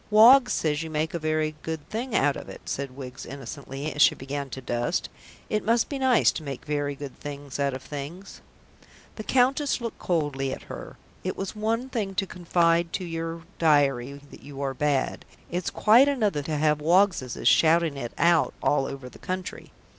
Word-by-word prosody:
"Woggs 240 +5 +7
says 150 -1 0
you 160 - -5
make 155 +1 -1
a 170 - -2
very 155 0 0
good 160 -2 -5
thing 235 +2 -3
out 140 +1 +3
of - - -8
it," - - -10
said 135 -1 -4
Wiggs 130 -1 -8
innocently, 140 +2 -6
as 145 - -1
she - - +6
began 140 +1 -5
to 135 - -6
dust. 120 -1 -2 0.4
"It 215 - -1
must 230 +1 +2
be 280 - -3
nice 260 -3 +4
to - - -6
make 140 -4 -7
very 145 -1 -1
good 140 -1 -9
things 145 -1 -7
out 140 -2 +1
of 130 - -8
things." 155 +7 -8 0.8
The 215 - -5
Countess 265 +4 +2
looked 230 -2 -5
coldly 145 -6 -1
at - - -8
her. - - -9 0.3
It - - -2
is 195 +2 -4
one 225 +4 -1
thing 210 -7 -3
to 195 +1 +1
confide 170 -2 +1
to 185 - -2
your 165 0 -4 0.2
diary 140 -4 +2
that - - -13
you 140 -1 -10
are 135 -1 -1
bad, 145 0 0 0.3
it's 175 +1 -1
quite 235 +6 +5
another 215 - +1
to 150 +1 -3
have 150 0 +2
Woggsseses 170 -6 +2
shouting 165 -1 +4
it 120 -4 -5
out 170 -1 +3
all 135 -2 +2
over 135 -2 -7
the - - -14
country. 185 0 -5
155 Hz, 190 wpm, -26 LUFS, 140-195 Hz, 0.8 s, Woggs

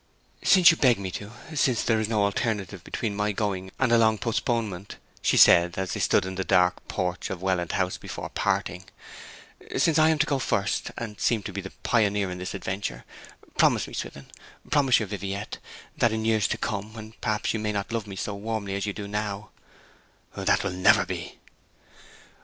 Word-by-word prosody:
'Since 180 -4 +7
you 165 - -2
beg 125 -4 +4
me 95 -2 -5
to, 100 +2 -6 0.2
since 130 -6 +2
there 115 -2 +2
is 110 0 -1
no 110 -2 +2
alternative 100 -2 -2
between 105 -4 -3
my 105 +1 0
going 95 -2 -2
and 130 -3 +1
a 115 - +6
long 110 -1 +4
postponement,' 110 -4 -2 0.3
she - - +2
said, 85 +1 +6
as 95 -1 -2
they - - -3
stood 95 - +3
in 95 - -4
the 95 0 -2
dark 90 -1 +2
porch 90 -1 -2
of 95 -1 -5
Welland 90 -3 0
House 95 -1 0
before - - -7
parting, 90 +1 -1 0.9
'since 160 -1 +3
I 155 0 +6
am 160 - +2
to 150 - +3
go 140 -3 0
first, 100 -6 -1
and 110 -3 -6
seem 115 -4 +1
to 100 - -6
be 100 - -3
the 95 - -7
pioneer 105 -4 +2
in 90 - -6
this 90 - -5
adventure, 95 -11 -4 0.5
promise - - +4
me, - - -11
Swithin, 70 -1 -6 0.5
promise 135 -4 +4
your 110 - -2
Viviette, 100 +1 -5 0.4
that 120 - +3
in 110 0 -2
years 110 -3 +3
to - - -2
come, 105 0 -4
when 110 -1 -9
perhaps 105 -1 0
you 110 - -2
may 105 0 -1
not 100 0 -3
love 115 -2 -2
me 100 - -7
so 100 +2 -3
warmly 100 -1 -4
as 100 +1 -2
you 100 - -2
do 100 0 -6
now 105 0 -4 0.4
' - - -32
'That - - +1
will - - -1
never 90 0 +4
be.' - - -6
105 Hz, 200 wpm, -26 LUFS, 95-110 Hz, 0.9 s, Since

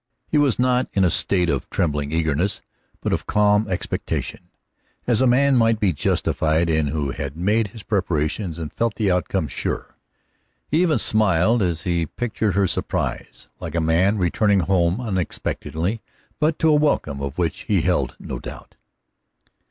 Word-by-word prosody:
He 150 - +2
was 140 -5 +3
not 125 0 +1
in 100 - +2
a 90 - +3
state 90 -3 +1
of 70 -5 -2
trembling 75 -3 -1
eagerness, 80 +3 0 0.4
but - - -1
of - - -2
calm 105 +1 +3
expectation, 90 - -3 0.6
as 120 -1 +3
a 130 - +4
man 135 +3 +4
might 115 -2 +3
be 100 -5 +2
justified 80 +3 +1
in 80 -1 +1
who 70 -1 -2
had 70 +3 -5
made 105 +5 +1
his 105 +1 -12
preparations 85 -2 -1
and 80 -2 -6
felt 115 -2 -1
the 105 -4 +1
outcome 90 -1 0
sure. - - -4 0.7
He 155 +4 +2
even 170 -4 +3
smiled 110 +1 +3
as 85 -4 -1
he 85 -3 0
pictured 110 - -2
her 100 0 +3
surprise, - - -3
like 80 0 -6
a - - +2
man 85 +6 +2
returning 100 +2 +2
home 90 +2 +1
unexpectedly, 95 -2 -2 0.4
but 155 0 +1
to 160 - +3
a - - +5
welcome 145 - +1
of 70 0 -5
which 85 -4 -2
he - - +3
held - - 0
no - - -6
doubt. - - -10
95 Hz, 165 wpm, -22 LUFS, 80-115 Hz, 0.7 s, a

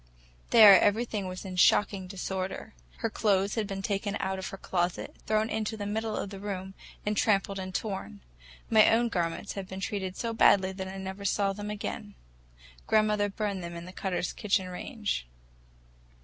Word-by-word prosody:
There 210 -4 +9
everything 210 -2 +1
was 185 +2 -7
in 185 -1 -6
shocking 195 +1 +3
disorder. 190 0 -4 0.3
Her - - +2
clothes 200 -2 +1
had 220 -3 -1
been 195 -1 -5
taken 200 0 -1
out 190 0 -2
of 190 - -4
her 195 - -7
closet, 175 -2 -2
thrown 215 0 +2
into 220 0 -2
the 205 - -4
middle 220 +1 -2
of 200 - -4
the 195 - -7
room, 190 -1 -5 0.3
and 210 0 0
trampled 200 -2 +1
and 185 0 -5
torn. 190 - -4 0.5
My 220 -1 +6
own 235 +1 +3
garments 175 0 -2
had 195 -2 -6
been 190 0 -7
treated 190 -2 -3
so 230 -2 -2
badly 190 -4 +5
that 190 0 -6
I 190 +1 -7
never 190 +1 -6
saw 200 0 +1
them 205 +1 -6
again; 210 0 -5 0.7
grandmother 210 -1 +3
burned 200 -2 -3
them 170 0 -6
in 170 0 -7
the 185 - -10
Cutters' 185 -2 -2
kitchen 195 -3 0
range. 200 - -4
200 Hz, 175 wpm, -29 LUFS, 190-210 Hz, 0.7 s, There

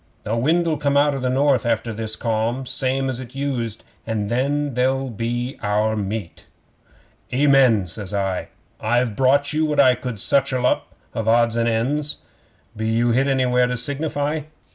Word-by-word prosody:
The 110 - -2
wind'll 160 +6 +1
come 140 -1 +1
out 145 0 +4
of 135 - -4
the 125 - 0
North 135 -1 +2
after 115 0 -1
this 110 0 -4
calm 115 +3 -1
same 135 +1 -1
as 130 -2 -3
it 125 0 -9
used 125 -6 -3 0.2
and 105 -2 -2
then 140 +4 0
they're 130 +2 +1 0.6
our 105 +1 +1
meat." 105 -2 -5 0.8
'"Amen," 130 -6 +4
says 95 +2 -5
I. 95 -2 -2 0.3
"I've 120 0 0
brought 140 +3 +3
you 155 +1 +1
what 150 -2 0
I 130 -2 +7
could 125 0 -5
scutchel 130 +4 +1
up - - 0 0.2
of 115 -1 -3
odds 115 0 +3
and 115 0 +1
ends. 140 +7 -1 0.6
Be 110 +1 -3
you 120 +1 +2
hit 130 +4 +2
anywhere 125 -2 +2
to 125 0 -2
signify?" 145 +3 -2
125 Hz, 165 wpm, -21 LUFS, 115-140 Hz, 0.8 s, I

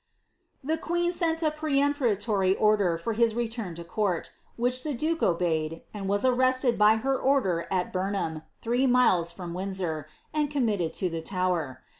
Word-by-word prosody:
"* - - -45
The 320 - 0
queen 345 +1 0
sent 330 -2 0
a 310 - +2
peremptory 260 -10 +1
order 205 -6 +2
for 225 +7 -3
his 230 0 +2
return 225 -6 -3
to 170 - -7
court, 180 0 -2 0.2
which 250 +2 +1
the 300 -3 -2
duke 320 +6 -1
obeyed, 165 -2 0
and 195 -2 -4
was 200 +4 +1
arrested 255 0 +3
by 210 +1 +5
her 270 +5 0
order 255 -12 +1
at 185 -2 -1
Bumham, 185 -4 -2 0.2
three 245 +3 +2
mile* 245 -9 +4
from 170 0 -6
Windsor, 180 -5 -3 0.3
and 300 -1 +1
committed 215 - 0
to 185 - -1
the 165 0 -3
Tower. 175 -7 -2
210 Hz, 165 wpm, -27 LUFS, 180-260 Hz, 0.3 s, by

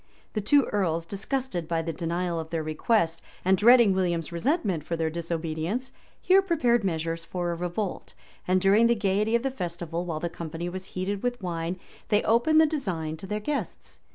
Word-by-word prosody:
The 215 - -1
two 280 +7 +5
earls, 170 -5 0
disgusted 200 - -3
by 165 -1 0
the 165 0 -3
denial 170 0 -2
of 160 0 -6
their 165 -1 -2
request, 165 +1 +1 0.2
and 190 +1 +5
dreading 230 0 +6
William's 175 -4 -1
resentment 195 - 0
for 170 - -3
their 160 -1 -1
disobedience, 170 +8 -3 0.3
here 380 +1 +5
prepared 295 - +2
measures 165 -2 -2
for 175 0 -3
a - - -2
revolt; 180 +3 -4 0.3
and 185 +1 +3
during 200 +5 +5
the 235 - +3
gayety 210 +1 +1
of 235 - +1
the 270 - 0
festival, 175 -6 -4
while 165 -3 -3
the 170 - -2
company 170 0 -5
was 185 +1 -6
heated 195 +2 -2
with 245 0 -1
wine, 175 -1 -3 0.3
they 210 -1 +3
opened 240 +8 +4
the 320 - +7
design 185 - -2
to 190 - -9
their 210 +1 -2
guests. 285 +7 -4
185 Hz, 185 wpm, -27 LUFS, 165-225 Hz, 0.3 s, the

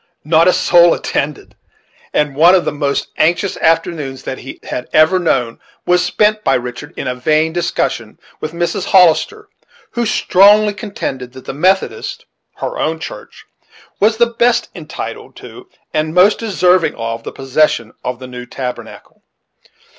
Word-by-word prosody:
Not 160 +2 +4
a 180 - +5
soul 175 -1 +4
attended; 150 0 -4 0.6
and 150 -2 0
one 170 +5 +6
of 180 - +1
the - - 0
most 145 -1 -2
anxious 175 +4 +1
afternoons 160 -5 -1
that 130 - -5
he 135 - -10
had 125 - -5
ever 155 +4 +4
known 125 -9 -1 0.3
was 180 0 +3
spent 215 0 +1
by - - +2
Richard 125 +6 -6
in - - -4
a 125 - -1
vain 155 +5 +1
discussion 175 0 -2 0.2
with 155 - -5
Mrs. 175 +2 -2
Hollister, 195 - +3 0.4
who 235 -2 -1
strongly 210 +1 +4
contended 140 - -6
that 130 -1 -12
the - - -5
Methodist 180 - -1 0.3
(her - - -5
own) 160 +1 -1
church - - -10 0.5
was 220 +2 +3
the 235 - +5
best 235 0 +1
entitled - - -8
to 375 0 -13 0.2
and 155 +1 -1
most 190 +4 +5
deserving 185 -5 +2
of, 115 0 -4
the - - -6
possession 135 -4 0
of 125 -1 -3
the 130 - -10
new 125 -1 -9
tabernacle. 125 -2 -8
165 Hz, 155 wpm, -16 LUFS, 135-195 Hz, 0.6 s, one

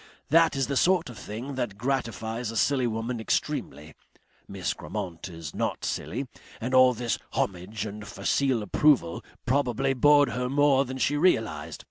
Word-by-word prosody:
That 165 0 +5
is 135 -1 +1
the 140 - -3
sort 175 -2 +2
of 115 - -12
thing 120 +7 -6
that 120 -6 -3
gratifies 115 -2 -2
a 115 - -4
silly 130 -1 +2
woman 115 +1 -3
extremely. 75 -8 -2 0.5
Miss - - -3
Grammont 85 0 -6
is 80 -3 -8
not - - -2
silly 115 - -3 0.3
and 125 +3 -3
all 130 -1 +6
this 120 0 -2
homage 95 +3 -2
and 105 0 -7
facile 130 -5 0
approval 105 - +2 0.2
probably 135 0 +1
bored 145 +1 +5
her 125 +1 -2
more 140 0 +3
than 130 +1 -6
she 145 +2 +1
realized. 145 -10 +1
125 Hz, 155 wpm, -27 LUFS, 110-135 Hz, 0.5 s, all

